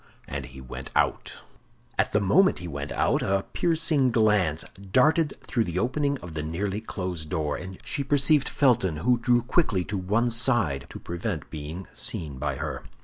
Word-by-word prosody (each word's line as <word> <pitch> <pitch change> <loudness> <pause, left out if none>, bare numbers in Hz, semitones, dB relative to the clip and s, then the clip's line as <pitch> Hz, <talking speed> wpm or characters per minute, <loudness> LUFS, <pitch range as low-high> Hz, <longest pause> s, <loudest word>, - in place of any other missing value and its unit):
and 70 -3 -5
he 65 +1 -12
went 65 0 -8
out. - - 0 0.5
At - - +1
the 105 - +3
moment 185 - +4
he 90 - -7
went 70 -2 -5
out - - +1
a 95 0 0
piercing 160 -5 +2
glance 105 -9 +2 0.3
darted 155 - +3
through 115 -3 0
the 85 -1 -4
opening 140 +6 0
of 85 -2 -8
the 80 - -3
nearly 95 +7 -2
closed 90 -7 -4
door, 75 -4 -1
and 95 +1 -7
she 125 +5 -2
perceived 140 +1 +3
Felton, 115 - +2
who 125 -1 +4
drew 120 0 +3
quickly 120 - +1
to 100 +2 -3
one 105 +6 +1
side 115 - +2
to - - -8
prevent 85 -2 -4
being 80 +5 -6
seen 75 -6 -2
by 70 -1 -1
her. - - -4
100 Hz, 175 wpm, -26 LUFS, 80-125 Hz, 0.5 s, moment